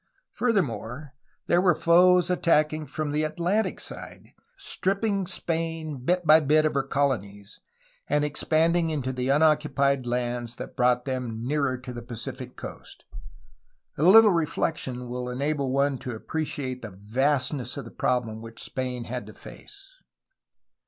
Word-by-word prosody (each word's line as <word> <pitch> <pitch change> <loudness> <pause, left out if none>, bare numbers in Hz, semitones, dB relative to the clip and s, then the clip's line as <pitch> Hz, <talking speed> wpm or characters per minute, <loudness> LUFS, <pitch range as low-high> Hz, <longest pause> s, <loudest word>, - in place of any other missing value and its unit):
Furthermore, 145 - -1 0.3
there 175 - +3
were 180 -3 +4
foes 175 +2 +5
attacking 155 -3 +2
from 155 -2 -3
the 150 +1 0
Atlantic 175 +7 -1
side, - - -8 0.2
stripping 195 0 -1
Spain 165 -4 -2
bit 180 +4 +1
by 155 +1 +8
bit 155 +1 +3
of 155 - +1
her 140 - +2
colonies, 110 -8 -2 0.5
and 150 0 +1
expanding 165 +3 +2
into 135 -4 -2
the 125 +1 -2
unoccupied 140 -3 +2
lands 120 -1 -2
that - - -8
brought 125 -1 +2
them 125 -4 -4
nearer 140 -1 0
to 125 0 -8
the 120 - -6
Pacific 125 +2 -7
coast. - - -10 0.9
A - - -5
little 210 +5 +8
reflection 150 -6 -2
will 125 +1 -4
enable 140 +2 -1
one 140 0 +1
to 130 -3 -5
appreciate 130 -1 -4
the 110 - -7
vastness 130 +7 -1
of 140 - -5
the 115 - -10
problem 115 -3 -1
which 115 0 -10
Spain 125 -2 -3
had 120 -2 -6
to 110 - -12
face. - - -14
140 Hz, 140 wpm, -26 LUFS, 125-160 Hz, 0.9 s, by